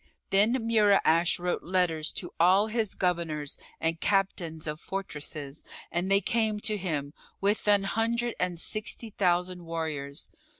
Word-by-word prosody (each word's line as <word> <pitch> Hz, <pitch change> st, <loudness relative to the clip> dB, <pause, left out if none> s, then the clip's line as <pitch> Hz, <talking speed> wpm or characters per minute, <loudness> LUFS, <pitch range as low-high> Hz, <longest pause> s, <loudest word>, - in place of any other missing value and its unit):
Then 205 Hz, +4 st, +5 dB
Mura'ash 205 Hz, -8 st, +3 dB
wrote 180 Hz, 0 st, -2 dB
letters 175 Hz, -4 st, +1 dB
to 175 Hz, -, -3 dB
all 185 Hz, +5 st, +5 dB
his 220 Hz, -2 st, -1 dB
Governors 165 Hz, -5 st, -1 dB, 0.2 s
and 165 Hz, 0 st, -1 dB
Captains 180 Hz, -5 st, 0 dB
of 150 Hz, 0 st, -4 dB
fortresses 150 Hz, -7 st, -5 dB, 0.3 s
and 175 Hz, +2 st, -1 dB
they 195 Hz, 0 st, +4 dB
came 220 Hz, -2 st, +1 dB
to 215 Hz, -, +1 dB
him 150 Hz, -7 st, -3 dB, 0.3 s
with 205 Hz, +2 st, +1 dB
an 205 Hz, -1 st, +5 dB
hundred 230 Hz, +3 st, 0 dB
and 180 Hz, -1 st, -1 dB
sixty 215 Hz, +3 st, -2 dB
thousand 180 Hz, -2 st, 0 dB
warriors. 155 Hz, -4 st, -4 dB
180 Hz, 135 wpm, -28 LUFS, 165-205 Hz, 0.3 s, Then